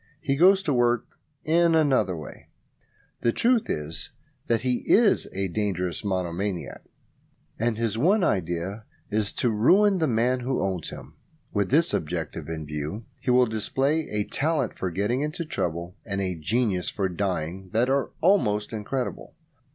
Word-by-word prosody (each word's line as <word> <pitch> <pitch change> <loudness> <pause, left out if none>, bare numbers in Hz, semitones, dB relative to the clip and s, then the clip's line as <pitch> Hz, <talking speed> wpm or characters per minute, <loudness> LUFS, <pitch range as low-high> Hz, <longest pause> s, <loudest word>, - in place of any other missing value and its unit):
He 135 - 0
goes 190 +5 +5
to 150 -7 0
work 120 -1 +2 0.4
in 165 +1 +4
another 135 - +2
way. 75 -4 -10 0.7
The 115 - +2
truth 235 - +2
is 75 +2 -4 0.4
that 115 -1 +2
he 125 0 +1
is 220 -1 +4
a 95 0 -2
dangerous 90 -2 -1
monomaniac, 95 -1 -3 0.8
and 115 0 0
his 115 -1 -1
one 190 - +3
idea 95 - -1 0.3
is 105 -1 +1
to 120 - +1
ruin 190 - +4
the 160 - +2
man 125 +1 +1
who 125 +1 -1
owns 95 -4 -2
him. - - -10 0.4
With 100 -2 0
this 160 +5 +3
object 80 -1 -2
in 80 -1 -5
view 75 +9 -5
he - - -4
will 125 0 +5
display 135 +8 -1
a 105 0 0
talent 150 0 -1
for 95 - -2
getting 105 +9 -1
into 150 +3 -3
trouble 85 - -3
and 100 -2 -3
a 95 -2 -1
genius 95 +3 0
for 100 -2 -1
dying 95 -1 -3
that 115 +3 +2
are 135 +1 +1
almost 115 - +2
incredible. 120 +4 -4
110 Hz, 155 wpm, -26 LUFS, 95-135 Hz, 0.8 s, goes